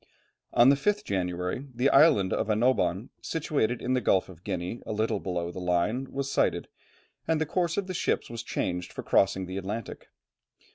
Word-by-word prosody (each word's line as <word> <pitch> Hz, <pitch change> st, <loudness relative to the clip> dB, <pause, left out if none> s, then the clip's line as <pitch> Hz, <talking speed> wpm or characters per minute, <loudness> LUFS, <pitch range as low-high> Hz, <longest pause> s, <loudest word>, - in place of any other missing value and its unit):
On 120 Hz, +2 st, +7 dB
the 140 Hz, -, +6 dB
5th 205 Hz, +8 st, 0 dB
January, 90 Hz, -, -2 dB
the 125 Hz, +3 st, +2 dB
island 135 Hz, -, +5 dB
of 110 Hz, -, -1 dB
Annobon, 110 Hz, -2 st, +1 dB
situated 145 Hz, -7 st, -1 dB
in 125 Hz, -, 0 dB
the 130 Hz, -, +1 dB
Gulf 95 Hz, -3 st, +2 dB
of 90 Hz, -1 st, -14 dB
Guinea, 95 Hz, +3 st, -4 dB
a -, -, -6 dB
little 110 Hz, +1 st, 0 dB
below 85 Hz, -2 st, -3 dB
the 95 Hz, -, -7 dB
Line, 90 Hz, +9 st, 0 dB
was 140 Hz, 0 st, -3 dB
sighted, -, -, +1 dB, 0.6 s
and 160 Hz, -1 st, +2 dB
the 160 Hz, -, +1 dB
course 170 Hz, +1 st, -1 dB
of 200 Hz, -, 0 dB
the 185 Hz, -, -5 dB
ships 175 Hz, -, 0 dB
was 115 Hz, 0 st, -6 dB
changed 90 Hz, -5 st, -3 dB
for -, -, -7 dB
crossing 95 Hz, -1 st, +2 dB
the 95 Hz, +1 st, -6 dB
Atlantic. 100 Hz, +3 st, -5 dB
110 Hz, 185 wpm, -28 LUFS, 95-135 Hz, 0.6 s, On